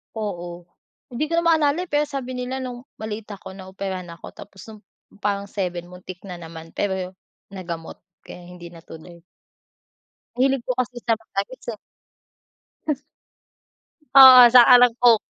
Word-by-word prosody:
Oo, 175 -5 -6 0.5
hindi 255 +6 -2
ko 330 - -2
na 335 - +1
maalala, 320 0 +2
eh, 365 - -13
pero 295 0 +1
sabi 270 -3 -6
nila 260 +1 -4
nung 250 +1 -8
maliit 215 0 -7
ako, 190 - -12
naoperahan 190 -1 -7
ako. 165 - -12
Tapos 195 -2 -14
no'ng 215 - -13 0.4
parang 200 -1 -2
7 180 -3 -5
muntik 180 0 -11
na 180 -3 -9
naman 165 -1 -11
pero 190 -2 -3 0.4
nagamot 170 -4 -8 0.2
kaya 175 -1 -12
hindi 175 -1 -12
natuloy. 165 0 -14 1.2
Mahilig 265 0 0
po 255 - -1
kasi 245 -1 -3
sa 230 -1 0
matamis, 220 +2 -7
eh. 215 - -9 1.1
Huh. 300 - +1 1.2
Oo, 260 -2 +10
saka 245 +1 +7
ng 245 -1 +5
Coke. 235 -2 +7
210 Hz, 145 wpm, -22 LUFS, 180-255 Hz, 1.2 s, Oo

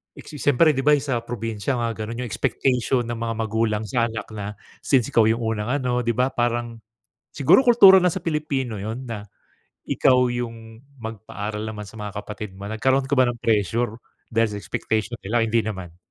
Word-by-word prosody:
siyempre 150 +1 +2
di 135 - -3
ba 150 +2 +5
sa 135 -4 -1
probinsya 115 +1 -3
nga 120 -1 -1
ganun 115 +2 -5
yung 120 - -5
expectation 125 +6 0
ng 120 0 -5
mga 115 0 -2
magulang 110 -1 0
sa 115 +3 0
anak 115 0 -5
na, 105 -1 -6 0.2
since 130 -5 +1
ikaw 110 -2 +4
yung 115 +1 +1
unang 110 -2 -2
ano 125 -2 0
di 120 - +1
ba 125 +3 +1
parang 120 -1 -1 0.5
siguro 145 - +5
kultura 235 -6 +8
na 180 - +3
sa 190 - -3
Pilipino 150 -7 -2
yun 110 +6 -5
na, 110 -3 -5 0.7
ikaw 125 -1 +4
yung 115 -2 -6 0.2
magpaaral 110 -1 -5
naman 105 -1 -6
sa - - -17
mga 105 -1 -6
kapatid 105 -2 -7
mo. 100 - -8
Nagkaroon 130 +5 +1
ka - - 0
ba 130 - +6
ng 120 - -4
pressure 110 +1 +1 0.4
dahil 115 0 +3
sa - - -4
expectation 110 +2 -2
nila 115 +4 +1
o - - +2
hindi 115 +1 +3
naman? 95 -6 -6
115 Hz, 185 wpm, -23 LUFS, 110-125 Hz, 0.7 s, kultura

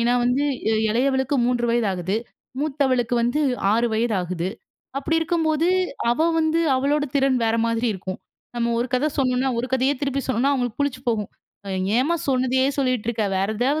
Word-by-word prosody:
ஏன்னா 240 +1 +2
வந்து, 250 +4 +2 0.4
இளையவளுக்கு 265 +4 +1
3 240 -1 +1
வயது 235 -3 +1
ஆகுது. 185 +3 -2 0.4
மூத்தவளுக்கு 265 -5 0
வந்து 245 +6 +1 0.3
6 230 +2 +2
வயது 225 0 +1
ஆகுது. 180 0 -3 0.5
அப்டி 325 +4 -1
இருக்கும்போது, 325 -1 +1 0.4
அவ 240 +6 0 0.2
வந்து 320 +1 +2 0.2
அவளோட 290 +3 +1
திறன் 270 -2 +2
வேற 225 0 +1
மாதிரி 230 +1 0
இருக்கும். 190 0 -6 0.4
நம்ம 235 0 0
ஒரு 240 - 0
கதை 270 +5 +2
சொன்னோம்னா, 260 0 +1
ஒரு 245 - -3
கதையே 265 +2 +2
திருப்பி 275 -1 -1
சொன்னோம்னா 260 +2 +1
அவங்களுக்கு 245 -3 -2
புளிச்சு 285 -3 -1
போகும். 215 -4 0 0.7
"ஏம்மா 315 +7 +2
சொன்னதையே 260 0 +2
சொல்லிட்டு 255 -5 0
இருக்க. 225 -2 0
வேற 195 +2 0
ஏதாவது 275 +6 +1
255 Hz, 160 wpm, -23 LUFS, 235-280 Hz, 0.7 s, ஏன்னா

